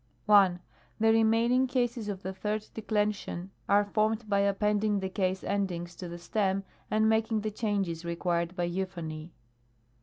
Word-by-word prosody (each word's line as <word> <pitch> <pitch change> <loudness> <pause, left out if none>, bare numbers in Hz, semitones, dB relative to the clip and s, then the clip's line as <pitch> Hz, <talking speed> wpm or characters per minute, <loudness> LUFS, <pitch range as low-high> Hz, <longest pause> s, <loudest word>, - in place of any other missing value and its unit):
1. 195 -4 +5 0.4
The 225 0 +5
remaining 230 +3 +3
cases 240 -4 -1
of 195 -2 -5
the 190 +1 -4
Third 210 +2 -3
Declension 210 -4 -2 0.2
are 205 +1 +5
formed 215 +2 0
by 200 -1 +2
appending 205 +1 +1
the 190 0 -3
case 190 -1 -1
endings 175 -4 -2
to 180 - -6
the 170 - -6
stem, 195 +2 0 0.3
and 220 0 +3
making 220 0 +2
the 215 +1 -2
changes 200 -6 -1
required 170 +1 -1
by 175 - -1
euphony. 175 -3 -4
200 Hz, 150 wpm, -29 LUFS, 185-215 Hz, 0.4 s, 1